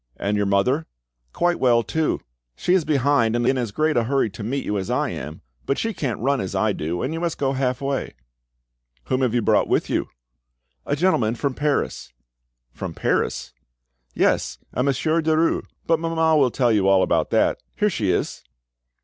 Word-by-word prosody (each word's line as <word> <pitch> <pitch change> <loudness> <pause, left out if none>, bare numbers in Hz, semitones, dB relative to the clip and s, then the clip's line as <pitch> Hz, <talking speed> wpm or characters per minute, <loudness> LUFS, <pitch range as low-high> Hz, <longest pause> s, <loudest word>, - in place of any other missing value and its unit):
"And 100 +1 -1
your 105 -1 +1
mother?" 125 +11 +1 0.4
"Quite 175 - 0
well 120 -2 +4
too. 160 +4 -1 0.3
She 180 - 0
is 185 -5 +3
behind, 140 -6 +2
in 120 +3 +2
as 120 -5 -2
great 155 +7 +1
a 120 - +2
hurry 135 -3 +1
to 105 - -9
meet 130 +6 -2
you 105 -1 -1
as 95 - -5
I - - 0
am. - - -7 0.3
But 135 - +1
she 225 0 -1
can't 130 - -3
run 135 +3 +1
as 95 - -4
I 110 -1 +2
do, 85 +1 -3
and 135 - -2
you 165 - -3
must 170 -1 -2
go 135 -1 0
half 130 -1 -1
way." 140 -1 -2 0.9
"Whom 130 0 +1
have 125 -2 +1
you 120 - +1
brought - - +3
with - - 0
you?" - - 0 0.8
"A 145 - +1
gentleman 130 -9 +2
from 140 +2 -1
Paris." 145 - -1 0.6
"From - - -6
Paris?" - - -1 0.6
"Yes, 60 -1 +1 0.2
a 125 - 0
Monsieur 150 +5 +1
Derues. 160 +1 +1 0.2
But 165 -1 +2
mamma 165 -1 +2
will 140 -4 +4
tell 120 0 +1
you 100 -3 +2
all 95 -1 +5
about - - +1
that. - - +2
Here 210 0 +1
she 105 - -1
is." - - -1
135 Hz, 190 wpm, -23 LUFS, 115-155 Hz, 0.9 s, all